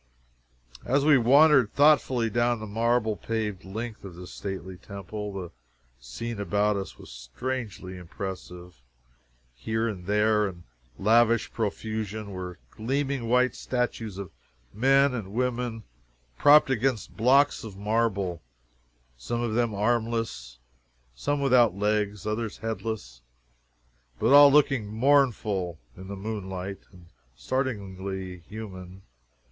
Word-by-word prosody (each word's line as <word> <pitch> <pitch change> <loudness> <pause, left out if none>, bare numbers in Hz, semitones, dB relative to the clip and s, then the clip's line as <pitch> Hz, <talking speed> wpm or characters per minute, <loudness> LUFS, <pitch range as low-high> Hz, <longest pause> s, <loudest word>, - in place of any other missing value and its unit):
As 140 +2 +1
we 150 -1 +7
wandered 135 -1 +5
thoughtfully 130 -6 +4
down 120 +1 +1
the 110 - -6
marble 115 +1 +1
paved 105 -1 -3
length 110 +4 -6
of 95 -3 -9
this 90 +1 -10
stately 95 -2 -6
temple, 100 +3 -7
the 95 -3 -6 0.5
scene 100 - -6
about 100 +2 +1
us 95 -1 -5
was - - -13
strangely 95 - -5
impressive. 90 -1 -8 0.8
Here 110 - -2
and 95 -5 -6
there, 105 0 +3
in 85 -2 -12 0.3
lavish 115 +2 +3
profusion, 110 -1 -3
were 90 -2 -6
gleaming 135 +1 -2
white 125 +1 +3
statues 120 -5 -3
of 100 -3 -7 0.4
men 135 +4 +4
and 105 -5 -5
women, 120 -2 -2 0.5
propped 145 - +6
against 125 -2 -1
blocks 135 +5 +3
of 105 -4 -9
marble, 100 -4 0 0.8
some 120 - -3
of 120 -2 -1
them 115 -2 +1
armless, 110 - -1 0.6
some 145 - -1
without 125 -7 +4
legs, 105 -1 -1
others 110 0 -3
headless 110 - -5 1.0
but 130 - +3
all 145 0 +9
looking 135 -6 +3
mournful 110 - +1 0.2
in 95 +1 -10
the 100 - -6
moonlight, 95 -2 -5
and 90 -2 -16 0.3
startlingly 95 - -4
human! 95 -3 -9
110 Hz, 120 wpm, -27 LUFS, 95-120 Hz, 1.0 s, all